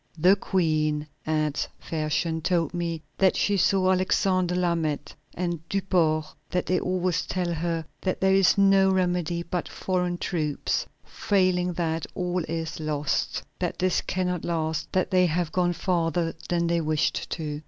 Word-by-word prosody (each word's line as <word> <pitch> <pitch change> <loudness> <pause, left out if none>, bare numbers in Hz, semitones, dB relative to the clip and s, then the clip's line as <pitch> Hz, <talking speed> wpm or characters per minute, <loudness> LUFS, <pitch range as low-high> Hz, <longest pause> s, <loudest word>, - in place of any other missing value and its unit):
"The 180 +5 +6
Queen," 155 -6 0 0.2
adds 155 -2 0
Fersen, 160 +1 -1
"told 165 -2 0
me 170 -2 -3 0.2
that 190 -1 +4
she 205 - +2
saw 190 0 +3
Alexander 185 -1 +2
Lameth 165 -5 -1 0.2
and 175 -1 -2
Duport; 170 -5 +1 0.2
that 180 -1 -1
they 185 - +1
always 180 -1 -1
tell 180 -2 -1
her 165 0 -2 0.2
that 185 - -1
there 190 0 +3
is 195 0 +4
no 195 -1 +5
remedy 175 -2 0
but 175 0 -3
foreign 180 -1 -1
troops; 155 -5 -1 0.2
failing 185 -4 +1
that, 165 -1 -2
all 180 -1 -1
is 160 -1 -4
lost, 150 -2 -1 0.2
that - - -2
this 185 -1 +1
cannot 180 -2 -2
last, 160 -2 -2
that 185 +1 0
they 180 -1 +4
have 170 0 -1
gone 175 0 +1
farther 170 -1 0 0.2
than 170 -1 +1
they 170 0 +1
wished 155 -1 0
to. 150 -2 -4
175 Hz, 150 wpm, -26 LUFS, 160-185 Hz, 0.2 s, The